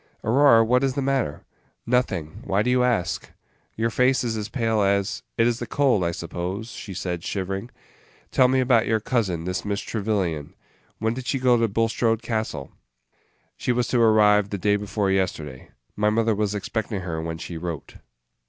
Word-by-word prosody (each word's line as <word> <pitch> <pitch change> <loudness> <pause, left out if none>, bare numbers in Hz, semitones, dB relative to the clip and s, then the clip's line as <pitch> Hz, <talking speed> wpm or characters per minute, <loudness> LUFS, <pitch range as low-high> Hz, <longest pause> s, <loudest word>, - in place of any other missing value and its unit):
"Aurora, 115 0 +5
what 125 +3 +3
is 135 -1 0
the 140 - 0
matter?" 135 - -1 0.4
"Nothing. 115 -11 -1
Why 100 +2 +1
do 125 - +1
you 125 0 +3
ask?" 120 -8 0 0.5
"Your 115 +1 0
face 130 +2 +2
is 115 -2 -1
as 105 0 -4
pale 115 -3 0
as 100 0 +1
" - - -52
"It 115 - +4
is 120 0 +1
the 120 - -5
cold, 135 -9 +2
I 85 - +1
suppose," 90 +6 -5
she 100 -6 -8
said, 90 -1 -3
shivering. 95 +4 -3 0.6
"Tell 130 - +5
me 130 +1 +2
about 120 -3 +3
your 110 0 +2
cousin, 105 -8 -1
this 90 +2 -3
Miss 100 0 -2
Trevyllian; 95 -11 -2 0.4
when 110 +1 0
did 130 +1 -7
she 135 - +1
go 125 -1 +4
to 115 -1 +2
Bulstrode 115 +1 0
Castle?" 110 - -3 0.8
"She - - -1
was 120 0 +1
to 120 - +2
arrive 105 -2 +5
the 100 - -3
day 105 +2 +2
before 105 -1 -1
yesterday. 80 -8 -2 0.3
My 105 0 +2
mother 115 +1 +2
was 105 0 -1
expecting 105 0 -3
her 85 -3 -4
when 80 0 -4
she 85 - -7
wrote." 85 -2 -6
110 Hz, 185 wpm, -24 LUFS, 95-120 Hz, 0.8 s, Aurora